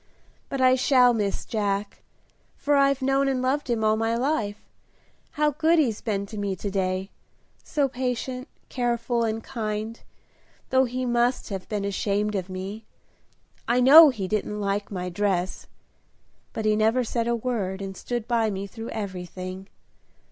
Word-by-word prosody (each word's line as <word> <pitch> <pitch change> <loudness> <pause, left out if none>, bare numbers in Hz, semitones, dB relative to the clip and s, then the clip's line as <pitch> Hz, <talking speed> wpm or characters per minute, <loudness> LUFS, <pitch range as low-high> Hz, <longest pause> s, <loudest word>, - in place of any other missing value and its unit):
But 275 - -3
I 255 0 +6
shall 255 -1 +5
miss 205 -3 -2
Jack, 205 -2 -2 0.5
for 290 0 +1
I've 275 -1 +3
known 270 +1 +2
and 265 -1 0
loved 265 +2 -1
him 230 -2 0
all 215 0 +3
my 225 +1 0
life. 230 -5 -1 0.7
How 300 -1 +2
good 325 +3 +2
he's 245 -9 +1
been 200 -4 -2
to 210 +1 -7
me 200 -1 -1
to 200 +2 -5
day! 190 0 -1 0.5
so 285 -2 0
patient, 255 0 -3 0.2
careful, 240 -1 -1
and 225 0 -2
kind, 220 -2 -4 0.7
though 260 0 +4
he 255 +1 -3
must 240 +1 +1
have 195 -3 -6
been 205 -2 -2
ashamed 205 +1 -1
of 190 -2 -3
me. 190 +4 -6 0.8
I 240 +2 +3
know 295 +5 +10
he 210 -8 -3
didn't 210 +1 -2
like 200 0 -1
my 180 -2 -4
dress; 185 -1 -1 0.8
but 220 - -4
he 215 0 +3
never 220 +4 +2
said 230 0 -2
a 235 - +2
word 215 -6 -2
and 195 -1 -6
stood 240 +3 -4
by 230 -2 +2
me 195 -1 -4
through 225 +3 -8
everything. 185 -2 -6
225 Hz, 160 wpm, -25 LUFS, 200-255 Hz, 0.8 s, know